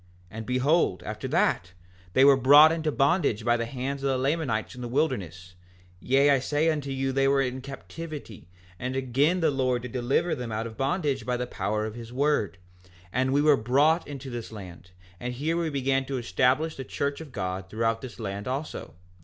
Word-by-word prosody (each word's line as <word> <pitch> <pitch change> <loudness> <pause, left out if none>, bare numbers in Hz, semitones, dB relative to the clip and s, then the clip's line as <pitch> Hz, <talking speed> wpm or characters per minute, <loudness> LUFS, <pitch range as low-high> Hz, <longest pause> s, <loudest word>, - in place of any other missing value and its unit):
5:5 90 - -29 0.2
And 110 0 -7
behold, 130 - +2
after - - -5
that, 90 +1 +1 0.4
they 130 - +6
were 140 -1 +8
brought 145 +5 +8
into 160 -2 -1
bondage 135 - +1
by 120 0 +4
the 115 -1 -2
hands 135 +2 -4
of 140 - 0
the 135 - +1
Lamanites 135 -5 -1
in 125 - -9
the 120 - -4
wilderness; 95 - -2 0.5
yea, 135 +6 +3
I 140 - +4
say 150 +5 +1
unto 145 -3 -3
you, 135 0 -1
they 135 +1 +2
were 135 0 +3
in 130 0 -3
captivity, 140 - -8 0.3
and 130 +1 -3
again 135 +7 +1
the 160 -2 +3
Lord 130 -3 0
did 125 - -6
deliver 130 +7 0
them 120 -2 -4
out 110 +1 -2
of 115 -1 -7
bondage 140 -2 -1
by 125 +2 -1
the 125 - -2
power 105 -1 -2
of 110 - -5
his 115 0 -9
word; 130 - 0 0.6
and 130 +2 +1
we 145 +2 +3
were 150 -1 +6
brought 140 +8 +2
into 135 -2 -7
this 120 -2 -6
land, 90 -4 -10 0.3
and 125 +3 -4
here 155 +6 -1
we 170 -1 0
began 135 -1 0
to 135 0 -3
establish 125 - +1
the 135 - -5
church 140 +3 -3
of 155 -4 -10
God 95 -3 -4
throughout 115 +2 -1
this 130 -2 -9
land 100 -1 -5
also. 135 +4 -5
130 Hz, 205 wpm, -27 LUFS, 115-145 Hz, 0.6 s, were